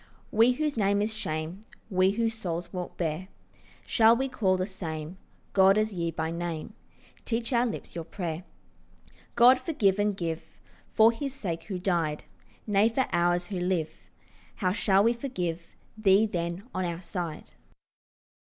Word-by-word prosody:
We 230 Hz, +3 st, +5 dB
whose 300 Hz, 0 st, -2 dB
name 200 Hz, -1 st, +2 dB
is 215 Hz, +2 st, 0 dB
shame, 160 Hz, -2 st, -4 dB, 0.3 s
We 185 Hz, 0 st, +4 dB
whose 225 Hz, +3 st, 0 dB
souls 175 Hz, -5 st, -4 dB
walk 180 Hz, -1 st, -5 dB
bare, 170 Hz, +2 st, -2 dB, 0.6 s
Shall 225 Hz, 0 st, +5 dB
we 265 Hz, +2 st, -1 dB
call 195 Hz, -7 st, +1 dB
the 185 Hz, -, 0 dB
same 170 Hz, -3 st, -6 dB, 0.3 s
God 195 Hz, +1 st, +6 dB
as 215 Hz, 0 st, +1 dB
ye 170 Hz, -2 st, -1 dB
by 160 Hz, 0 st, -3 dB
name, 170 Hz, -2 st, -4 dB, 0.5 s
Teach 230 Hz, +2 st, -2 dB
our 240 Hz, +1 st, +3 dB
lips 225 Hz, -, -6 dB
your 170 Hz, -, -4 dB
prayer? 170 Hz, -1 st, -5 dB, 0.9 s
God, 250 Hz, +2 st, +7 dB
forgive 210 Hz, -, +1 dB
and 205 Hz, -1 st, +1 dB
give, 165 Hz, -3 st, -3 dB, 0.5 s
For 220 Hz, 0 st, +6 dB
His 275 Hz, +3 st, -5 dB
sake 165 Hz, -9 st, -4 dB
who 185 Hz, +2 st, -4 dB
died? 170 Hz, -5 st, 0 dB, 0.4 s
Nay, 210 Hz, +1 st, +3 dB
for 255 Hz, +3 st, +1 dB
ours 175 Hz, +1 st, +2 dB
who 185 Hz, -, -1 dB
live, 175 Hz, -3 st, 0 dB, 0.6 s
How 185 Hz, -4 st, 0 dB
shall 195 Hz, 0 st, +3 dB
we 230 Hz, +2 st, +4 dB
forgive 180 Hz, -10 st, -4 dB, 0.2 s
Thee, 210 Hz, -1 st, +4 dB
then, 175 Hz, -2 st, -3 dB
on 185 Hz, -, -1 dB
our 170 Hz, 0 st, -4 dB
side? 175 Hz, -4 st, -5 dB
190 Hz, 155 wpm, -28 LUFS, 170-220 Hz, 0.9 s, God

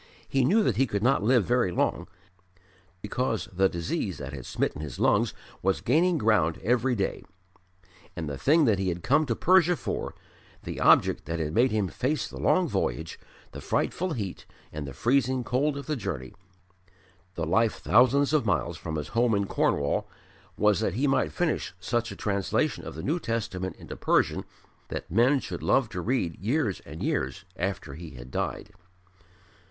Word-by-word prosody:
He 135 Hz, -1 st, +1 dB
knew 210 Hz, -, +4 dB
that 115 Hz, -, +1 dB
he 135 Hz, +1 st, +3 dB
could 100 Hz, -2 st, -2 dB
not 135 Hz, +3 st, +3 dB
live 115 Hz, -1 st, +3 dB
very 120 Hz, -6 st, +2 dB
long, -, -, 0 dB, 1.0 s
because 115 Hz, +1 st, -1 dB
the 95 Hz, +1 st, +3 dB
disease 85 Hz, -1 st, -3 dB
that 70 Hz, 0 st, -7 dB
had 65 Hz, -3 st, -7 dB
smitten 70 Hz, -, -2 dB
his 75 Hz, -5 st, -6 dB
lungs -, -, +3 dB, 0.3 s
was 95 Hz, 0 st, +1 dB
gaining 165 Hz, +7 st, +2 dB
ground 105 Hz, -, +2 dB
every 125 Hz, +2 st, +2 dB
day. 100 Hz, -3 st, -2 dB, 0.9 s
And 80 Hz, -2 st, -4 dB
the 70 Hz, -, -3 dB
thing 150 Hz, -, +4 dB
that 105 Hz, -6 st, +3 dB
he 95 Hz, -1 st, 0 dB
had 85 Hz, 0 st, -4 dB
come 145 Hz, +3 st, +3 dB
to 115 Hz, -, 0 dB
Persia 180 Hz, +2 st, +4 dB
for -, -, -4 dB, 0.5 s
the -, -, -5 dB
object -, -, +4 dB
that 85 Hz, -, -3 dB
had 75 Hz, -1 st, -2 dB
made 125 Hz, +6 st, +4 dB
him 105 Hz, -4 st, 0 dB
face 130 Hz, -, -1 dB
the -, -, -9 dB
long 185 Hz, -1 st, +3 dB
voyage, -, -, -2 dB, 0.3 s
the -, -, -8 dB
frightful 180 Hz, -1 st, -1 dB
heat 100 Hz, -, -5 dB, 0.3 s
and 75 Hz, -1 st, -5 dB
the 70 Hz, -, -7 dB
freezing 130 Hz, -, +1 dB
cold 140 Hz, +5 st, 0 dB
of 140 Hz, -, -6 dB
the 155 Hz, -, -1 dB
journey, 65 Hz, -, -5 dB, 1.0 s
the -, -, -2 dB
life 115 Hz, -1 st, +2 dB
thousands 135 Hz, +5 st, +3 dB
of 155 Hz, -, +3 dB
miles 85 Hz, -, 0 dB
from 80 Hz, +1 st, -5 dB
his 75 Hz, -2 st, -4 dB
home 115 Hz, -1 st, +2 dB
in 100 Hz, 0 st, +1 dB
Cornwall 70 Hz, -6 st, 0 dB, 0.5 s
was 105 Hz, -1 st, +3 dB
that 105 Hz, -4 st, -1 dB
he 135 Hz, +5 st, +1 dB
might 135 Hz, -, +2 dB
finish 175 Hz, -, -1 dB
such 120 Hz, +4 st, -1 dB
a -, -, -7 dB
translation 100 Hz, -2 st, -1 dB
of -, -, -7 dB
the 80 Hz, -, -6 dB
New 160 Hz, +6 st, 0 dB
Testament 95 Hz, -, -3 dB
into -, -, -9 dB
Persian -, -, +1 dB, 0.4 s
that -, -, -6 dB
men 125 Hz, -, +4 dB
should -, -, -6 dB
love 130 Hz, -4 st, +2 dB
to 90 Hz, -, -4 dB
read 100 Hz, -6 st, -1 dB
years 110 Hz, -, 0 dB
and 75 Hz, +3 st, -7 dB
years 65 Hz, +9 st, -2 dB
after 95 Hz, -5 st, -3 dB
he 80 Hz, 0 st, -9 dB
had -, -, -10 dB
died. -, -, -3 dB
110 Hz, 180 wpm, -27 LUFS, 85-130 Hz, 1.0 s, knew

